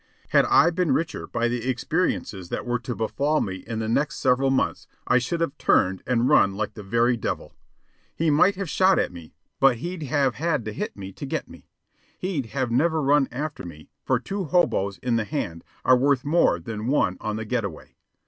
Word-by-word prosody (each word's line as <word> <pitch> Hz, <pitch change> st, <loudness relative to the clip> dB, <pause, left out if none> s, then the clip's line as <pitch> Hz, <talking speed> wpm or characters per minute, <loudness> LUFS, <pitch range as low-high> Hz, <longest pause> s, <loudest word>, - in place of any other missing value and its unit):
Had -, -, +4 dB
I 170 Hz, -, +5 dB
been 170 Hz, -4 st, +1 dB
richer 165 Hz, 0 st, -3 dB
by 120 Hz, -, 0 dB
the 120 Hz, +1 st, -2 dB
experiences 120 Hz, -, -1 dB
that -, -, -4 dB
were 120 Hz, 0 st, -1 dB
to 120 Hz, 0 st, -5 dB
befall 145 Hz, +7 st, 0 dB
me 95 Hz, -2 st, -3 dB
in 110 Hz, +4 st, -6 dB
the 110 Hz, 0 st, -2 dB
next 145 Hz, +8 st, 0 dB
several 135 Hz, +2 st, +2 dB
months, 135 Hz, 0 st, 0 dB, 0.2 s
I 125 Hz, -, +4 dB
should 165 Hz, +7 st, -3 dB
have 165 Hz, -4 st, -1 dB
turned 95 Hz, 0 st, +2 dB
and 125 Hz, 0 st, +2 dB
run 100 Hz, -9 st, +4 dB
like 105 Hz, 0 st, -3 dB
the 110 Hz, -, -9 dB
very 115 Hz, +5 st, +2 dB
devil. 110 Hz, -, -4 dB, 0.6 s
He 160 Hz, -1 st, +1 dB
might 180 Hz, +7 st, +4 dB
have 195 Hz, 0 st, -4 dB
shot 190 Hz, +4 st, +3 dB
at -, -, 0 dB
me, 85 Hz, -3 st, -12 dB, 0.2 s
but 135 Hz, -3 st, +5 dB
he'd 175 Hz, +6 st, -5 dB
have 140 Hz, -2 st, +1 dB
had 150 Hz, -5 st, -1 dB
to 110 Hz, -, -4 dB
hit -, -, -5 dB
me 95 Hz, -1 st, -7 dB
to -, -, -8 dB
get -, -, -3 dB
me. -, -, -15 dB, 0.5 s
He'd 170 Hz, -10 st, -3 dB
have 130 Hz, 0 st, -2 dB
never 160 Hz, +6 st, +2 dB
run 145 Hz, -1 st, +3 dB
after 150 Hz, +5 st, -5 dB
me, 80 Hz, -4 st, -11 dB
for -, -, +1 dB
two 195 Hz, -1 st, -4 dB
hoboes 100 Hz, -, +1 dB
in 120 Hz, -2 st, +1 dB
the 115 Hz, -, 0 dB
hand 95 Hz, -, -4 dB, 0.2 s
are 130 Hz, -, +7 dB
worth 135 Hz, +1 st, +2 dB
more 165 Hz, +4 st, +3 dB
than 115 Hz, -2 st, -5 dB
one 125 Hz, -9 st, +2 dB
on 110 Hz, 0 st, -2 dB
the 110 Hz, 0 st, -4 dB
get 120 Hz, +1 st, -1 dB
away. 95 Hz, -6 st, -8 dB
125 Hz, 210 wpm, -24 LUFS, 110-155 Hz, 0.6 s, are